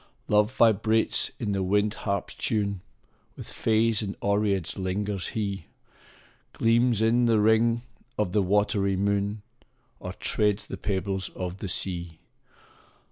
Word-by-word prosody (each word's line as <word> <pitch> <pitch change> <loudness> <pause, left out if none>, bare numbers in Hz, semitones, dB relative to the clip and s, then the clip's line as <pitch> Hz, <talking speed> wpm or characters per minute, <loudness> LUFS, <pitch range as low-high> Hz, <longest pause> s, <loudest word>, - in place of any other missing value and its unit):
Love 105 +2 +3
vibrates 110 -1 +3
in 110 -4 -2
the 100 -1 -1
wind 105 +2 +1
harp 100 -3 -2
s - - -4
tune 100 -3 -1 0.5
With - - -9
fays 110 0 +1
and 100 -2 -4
oreads 100 -3 0
lingers 95 +1 -2
he 100 -5 -3 0.9
Gleams 115 -1 +2
in 120 +2 +3
th 115 -1 +3
ring 115 +2 +3 0.3
of 105 -4 0
the 105 - +2
watery 100 0 +1
moon, 100 +1 -1 0.6
Or 90 -1 -6
treads 105 +2 0
the - - -7
pebbles 95 -1 -2
of 90 +1 -5
the 100 - -4
sea. 85 -3 -2
105 Hz, 135 wpm, -26 LUFS, 95-110 Hz, 0.9 s, Love